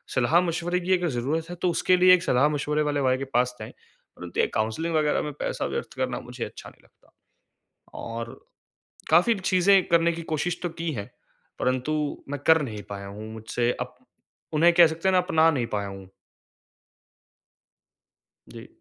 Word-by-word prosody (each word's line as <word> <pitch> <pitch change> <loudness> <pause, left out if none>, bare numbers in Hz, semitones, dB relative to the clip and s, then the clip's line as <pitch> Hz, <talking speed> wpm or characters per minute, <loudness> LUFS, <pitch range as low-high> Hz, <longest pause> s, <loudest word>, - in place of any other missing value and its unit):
सलाह-मशवरे 170 +6 +1
की 185 +1 0
अगर 175 -1 -1
ज़रूरत 145 +6 -2
है 175 - -6
तो 180 - +2
उसके 185 +2 +2
लिए 185 0 +7
एक 180 -2 +3
सलाह-मशवरे 150 +3 +1
वाले 145 -1 0
भाई 130 -1 +2
के 135 - -4
पास 125 +1 +1
जाएँ, 110 - -8 0.5
परंतु 90 -1 -7
ये - - +3
काउंसलिंग 135 +10 -1
वग़ैरह 150 -1 +2
में 150 - -4
पैसा - - -2
व्यर्थ - - -4
करना - - -2
मुझे - - -6
अच्छा - - -10
नहीं - - -24
लगता। - - -29 0.9
और 115 0 -6 0.8
काफ़ी 180 +9 +5
चीज़ें 185 +1 +3
करने 170 0 +3
की 170 - -6
कोशिश 165 +3 -1
तो 175 - -1
की 165 0 -4
है, 100 -4 -6 0.5
परन्तु 130 +4 0 0.4
मैं 145 - -4
कर 160 0 +6
नहीं 105 -6 -6
पाया 100 -1 -6
हूँ 105 +2 -8
मुझसे 110 +2 -1
अब - - -6 0.6
उन्हें 170 +3 +5
कह 170 -1 +7
सकते 160 +3 -3
है - - +3
ना 185 - +5
अपना 165 -3 +3
नहीं 130 -6 -1
पाया 100 -1 -2
हूँ। 95 -1 -10 2.4
जी। - - -11
155 Hz, 170 wpm, -25 LUFS, 120-170 Hz, 2.4 s, लिए